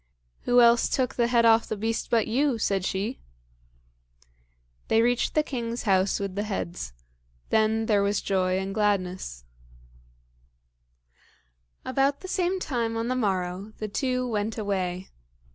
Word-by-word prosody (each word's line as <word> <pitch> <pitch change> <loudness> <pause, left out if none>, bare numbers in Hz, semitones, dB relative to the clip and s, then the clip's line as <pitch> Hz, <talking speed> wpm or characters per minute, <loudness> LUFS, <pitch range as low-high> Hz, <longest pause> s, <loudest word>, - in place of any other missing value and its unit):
"Who 245 0 +5
else 235 0 +5
took 255 -2 0
the 235 -1 +1
head 235 -1 +3
off 225 0 +5
the 215 - -3
beast 225 +2 -2
but 230 -3 +3
you?" 260 +2 +1
said 195 -3 0
she. 205 +8 -2 1.7
They 225 - +3
reached 245 +1 +1
the 305 - +4
king's 235 -4 -4
house 190 -2 +2
with 200 -2 -3
the 205 - -2
heads. 195 -4 -4 0.6
Then 220 0 +2
there 210 -2 +3
was 200 0 +1
joy 185 -1 0
and 190 +1 -3
gladness. 185 - -1 2.4
About 275 +2 +1
the 375 - -7
same 370 0 0
time 235 -8 -2
on 230 +1 -2
the 255 - 0
morrow, 195 -2 -2
the 215 - -4
two 255 +3 -1
went 215 -1 -2
away. 190 -3 -2
220 Hz, 145 wpm, -26 LUFS, 195-245 Hz, 2.4 s, Who